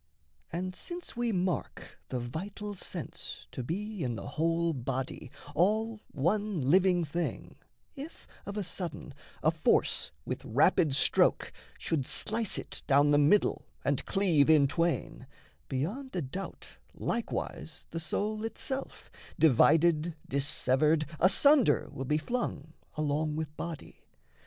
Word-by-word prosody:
And 185 +1 -3
since 345 - -6
we 240 -1 0
mark 180 -3 -2
the 130 - -2
vital 195 - -5
sense 190 - -6
to - - -5
be 205 - -3
In 120 -2 -1
the - - -6
whole 165 +1 +1
body, 130 +2 -4 0.2
all 215 +7 +1
one 200 +6 0
living 180 -1 +4
thing, 165 +3 -3 0.4
If 290 +3 -9 0.2
of 200 +1 -5
a 205 - -1
sudden 165 -4 -6 0.3
a 155 - +5
force 160 -1 +2 0.2
with 130 +2 -4
rapid 140 +3 +3
stroke 135 - +3 0.2
Should 145 -6 -1
slice 220 -1 0
it - - -6
down 145 +1 +5
the 145 - +5
middle 150 +8 +3 0.2
and 140 -2 +1
cleave 175 -8 +3
in 155 -3 +7
twain, 165 -3 -1 0.4
Beyond 195 - -3
a 175 - 0
doubt 185 +9 -7 0.2
likewise 230 -7 -4
the 165 - -3
soul 210 +6 -2
itself, 265 +4 -4 0.3
Divided, 160 +3 +4
dissevered, 145 +2 +2
asunder 215 - +5
will 135 - -5
be 150 +3 +2
flung 160 - -3 0.2
Along 150 0 0
with 155 -1 -4
body. 165 -2 -7
165 Hz, 130 wpm, -30 LUFS, 145-200 Hz, 0.4 s, in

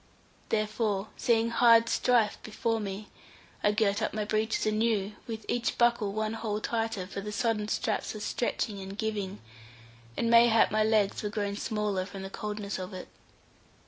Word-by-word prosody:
Therefore, 215 -1 0
seeing 230 -2 +2
hard 230 -1 +6
strife 230 -3 +2
before 225 +1 -1
me, 205 0 -5 0.5
I 205 - +4
girt 210 -1 +1
up 215 - -1
my 215 -1 -1
breeches 215 +1 0
anew, 215 -2 +1
with 225 -2 -6
each 240 0 -1
buckle 235 -4 +3
one 215 +1 -2
hole 215 -2 -2
tighter, 225 -4 -2
for 195 +1 -6
the 210 +1 -5
sodden 210 0 0
straps 215 - -1
were - - -5
stretching 210 -2 -2
and 195 +1 -8
giving, 210 -3 -3 0.8
and 230 - +1
mayhap 230 -1 +6
my 215 +1 +3
legs 215 -2 +2
were 210 - -2
grown 205 -1 -2
smaller 205 -3 -1
from 195 -1 -8
the 195 - -7
coldness 210 -2 -4
of 185 +1 -6
it. 185 - -8
215 Hz, 165 wpm, -29 LUFS, 205-225 Hz, 0.8 s, hard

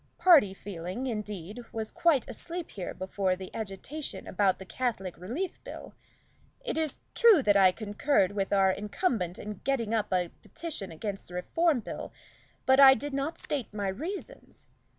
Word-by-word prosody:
Party 315 - +7
feeling, 190 +4 -6
indeed, 210 -2 -5
was 220 -1 -4
quite 320 -7 +2
asleep 335 +7 -6
here 185 -3 -5
before 190 0 -1
the 185 0 -9
agitation 225 +8 -5
about 190 -1 +2
the 190 - -9
Catholic 195 -2 -2
Relief 250 - -4
Bill. - - -9 0.7
It - - -4
is 315 -2 -1 0.2
true 440 - +6
that 205 -2 +4
I 190 -2 +7
concurred 205 +1 +1
with 200 -1 -2
our 195 -1 +4
incumbent 205 - -1
in 210 -2 -7
getting 240 -5 0
up 215 -3 0
a 180 -2 +1
petition 305 - -5
against 195 +4 -5
the 180 - -9
Reform 305 - +1
Bill, - - -6 0.5
but 265 +1 +5
I 270 -1 +10
did 290 +4 -5
not 280 +4 -2
state 270 -8 -4
my 200 -2 -1
reasons. 370 - -7
210 Hz, 160 wpm, -29 LUFS, 190-280 Hz, 0.7 s, I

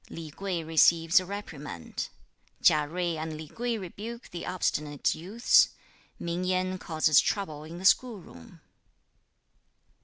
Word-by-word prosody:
Li 160 -2 -8
Kuei 185 0 -3
receives 165 +1 +5
a 185 - -6
reprimand. 150 - -6 0.5
Chia 150 -1 +5
Jui 170 +1 -2
and 155 0 -4
Li 155 0 -8
Kuei 235 +6 -2
rebuke 215 +5 -8
the 175 - -6
obstinate 150 -5 0
youths! 200 +9 +3 0.4
Ming 170 +1 -3
Yen 185 0 0
causes 155 -3 +3
trouble 155 -8 -2
in 165 +2 -9
the 185 - -7
school 230 +1 +4
room. 85 - -15
170 Hz, 130 wpm, -28 LUFS, 155-190 Hz, 0.5 s, receives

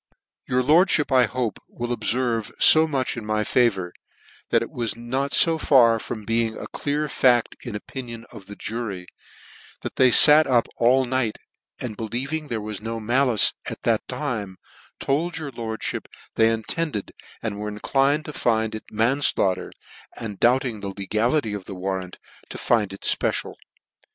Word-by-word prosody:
" - - -56
Your 125 0 +2
lordfhip, 155 +1 +3
I 125 -1 +6
hope, 120 -1 -3
will 120 0 -4
obferve 120 -3 -1
fo 160 0 +7
much 135 -4 -1
in 115 - -6
my 105 0 -1
favour, 100 -8 +1 0.6
that 115 - +2
it - - -9
was 120 -6 -3
fo 135 +7 +1
far 115 -6 +4
from 110 -1 -7
being 115 0 0
a - - -7
clear 150 +1 -2
fact 125 -4 +2
in 120 - -7
the - - -2
opinion 115 0 -8
of 105 -5 -12
the 100 - -9
jury, 105 -5 -5 0.8
that - - -7
they 130 - +6
fat 150 +5 +8
up 120 -3 +2
all 130 +3 +3
night, 125 -3 -1 0.4
and 115 -4 -5
believing 135 +8 -4
there 120 -5 -3
was 105 -1 -6
no 115 +1 -4
malice 120 0 +3 0.2
at - - -9
that - - 0
time, 100 -6 -4 0.4
told 160 +6 -1
your 150 -3 -5
lordfhip 115 -2 -5 0.3
they 110 0 +3
intended, 115 +2 -3 0.3
and 105 -3 -4
were 105 - -4
inclined 135 +8 0
to 150 - -7
find 110 -4 0
it 110 - -7
manslaughter, 110 -5 +1 0.5
and, 105 -4 -7
doflbt 130 +3 +3
ing 115 -4 -4
the 100 - -6
legality 110 +5 0
of 100 -2 -6
the 95 - -8
warrant, 95 0 -4 0.3
to - - -7
find 110 -5 +1
it 100 - -10
fpecial. - - -1
115 Hz, 165 wpm, -23 LUFS, 110-130 Hz, 0.8 s, fat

